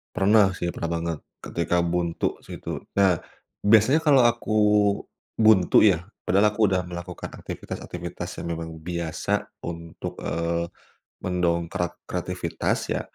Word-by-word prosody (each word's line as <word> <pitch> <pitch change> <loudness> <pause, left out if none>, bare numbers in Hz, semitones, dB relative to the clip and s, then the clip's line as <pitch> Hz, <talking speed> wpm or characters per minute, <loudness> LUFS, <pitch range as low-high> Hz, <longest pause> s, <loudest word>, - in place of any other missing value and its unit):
Pernah 100 0 +5
sih, 90 -1 -3
pernah 85 0 -3
banget, 85 -1 -2 0.2
ketika 85 +1 -2 0.2
buntu 85 -1 0
sih - - -8
itu, - - -5 0.2
nah, 95 -3 +5 0.5
biasanya 115 +8 +5
kalau 145 -4 +6
aku 120 -2 -1 0.9
buntu 110 -5 +6
ya, 80 - -2 0.2
padahal 100 +3 +4
aku 105 0 +3
udah 95 -1 +1
melakukan 90 0 -7
aktivitas-aktivitas 85 -1 -6 0.2
yang - - -4
memang 80 0 -5
biasa 85 -2 -3 0.3
untuk, 85 -1 -6
eee, 85 0 -1 0.6
mendongkrak 85 -1 0
kreativitas 90 -1 -2
ya, - - 0
90 Hz, 125 wpm, -25 LUFS, 85-100 Hz, 0.9 s, kalau